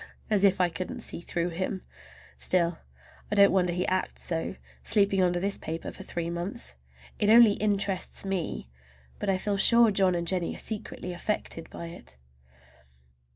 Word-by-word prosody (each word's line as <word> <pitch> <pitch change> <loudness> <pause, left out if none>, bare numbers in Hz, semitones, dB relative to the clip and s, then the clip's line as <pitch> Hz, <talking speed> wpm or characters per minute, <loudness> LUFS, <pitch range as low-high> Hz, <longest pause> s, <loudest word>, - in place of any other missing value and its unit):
As 205 -2 +3
if 195 -1 +4
I 180 -1 +3
couldn't 175 +2 -5
see - - -1
through 175 0 -2
him! 185 +2 -3 0.5
Still, 170 -2 +1 0.5
I - - +1
don't 200 -1 +6
wonder 180 -2 +2
he 180 +1 -1
acts 185 0 -2
so, 165 +2 -3 0.3
sleeping 200 -2 +2
under 175 -1 +2
this 200 +2 0
paper 160 +1 -5
for - - -11
three 170 -1 -4
months. 170 - -4 0.5
It 205 - +2
only 230 -1 +8
interests 200 -3 0
me, 180 - -3 0.5
but - - -2
I 190 - +2
feel 200 +1 -1
sure 235 +2 +6
John 190 -2 +2
and 170 0 -2
Jennie 180 -2 0
are - - -9
secretly 210 -4 -3
affected 175 -3 -4
by 170 - -8
it. 165 - -11
185 Hz, 165 wpm, -28 LUFS, 175-200 Hz, 0.5 s, only